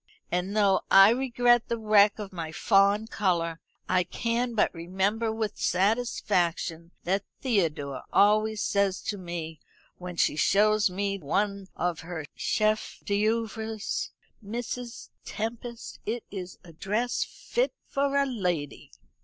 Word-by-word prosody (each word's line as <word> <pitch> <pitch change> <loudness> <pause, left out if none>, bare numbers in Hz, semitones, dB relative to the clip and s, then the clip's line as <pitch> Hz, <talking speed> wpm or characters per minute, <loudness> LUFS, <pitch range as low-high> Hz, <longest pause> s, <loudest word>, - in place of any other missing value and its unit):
And 185 +4 -1
though 195 -3 +4
I 195 +2 +8
regret 240 -1 +3
the 235 - -1
wreck 210 -2 +4
of 205 -3 -7
my 165 -3 -5
fawn 200 +4 +3
colour, 170 -6 -1 0.3
I 185 0 +3
can 235 +6 -2
but 215 - +2
remember 190 +6 -1
with 220 -2 -3
satisfaction 180 -5 0
what 195 +3 0 0.2
Theodore 160 - -1
always 215 +1 +3
says 200 -2 +1
to 205 -2 -3
me 170 -3 -6 0.4
when 180 -1 -7
she 160 - +2
shows 210 +5 +3
me 200 +2 -2
one 200 +5 -1
of 175 -1 -1
her 165 -2 -6
chef 215 0 0
d'oeuvres: 220 +1 -1 0.3
'Mrs. 240 +2 -5
Tempest, 230 +2 -6
it 230 +2 -2
is 185 -2 -7
a 170 -2 -14
dress 215 +9 -1
fit - - -2
for 280 0 0
a 280 - +3
lady.' 180 - -3
205 Hz, 130 wpm, -27 LUFS, 180-225 Hz, 0.4 s, I